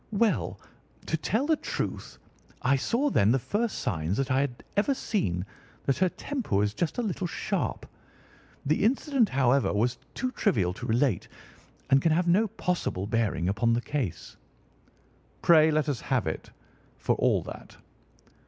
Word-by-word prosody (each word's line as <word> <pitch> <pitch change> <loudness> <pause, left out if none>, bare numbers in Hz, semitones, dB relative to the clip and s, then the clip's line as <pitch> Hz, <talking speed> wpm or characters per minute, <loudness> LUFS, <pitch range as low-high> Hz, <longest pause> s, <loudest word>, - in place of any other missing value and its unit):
"Well, 215 -5 +1 0.5
to - - 0
tell 215 - 0
the 320 +1 +3
truth, - - -4 0.5
I 135 +2 +4
saw 250 - 0
then 105 - +4
the 130 - +4
first 210 - -1
signs 80 +4 -1
that 135 -1 -1
I 130 +1 +3
had 130 -4 -3
ever 215 +8 +2
seen 90 - -1 0.4
that 135 - +1
her 185 -1 +3
temper 260 - -3
was 105 +1 +2
just 165 - -2
a 245 - 0
little 190 -3 -2
sharp. - - -2 0.8
The 155 +6 +1
incident 255 0 +2
however, 135 0 +2
was 120 +4 0 0.2
too 255 -1 -2
trivial 90 - +1
to - - -7
relate 120 - +1 0.6
and 135 0 +6
can 165 - +2
have 175 +2 +1
no 200 +6 +4
possible 175 - -2
bearing 105 -5 0
upon 115 +4 +2
the 120 - +1
case." 130 - -4 1.1
"Pray 160 -2 +6
let 155 -1 +1
us 145 -5 -2
have 130 -4 0
it, 80 - -4 0.5
for - - +1
all - - +2
that." - - -10
140 Hz, 160 wpm, -28 LUFS, -, 1.1 s, and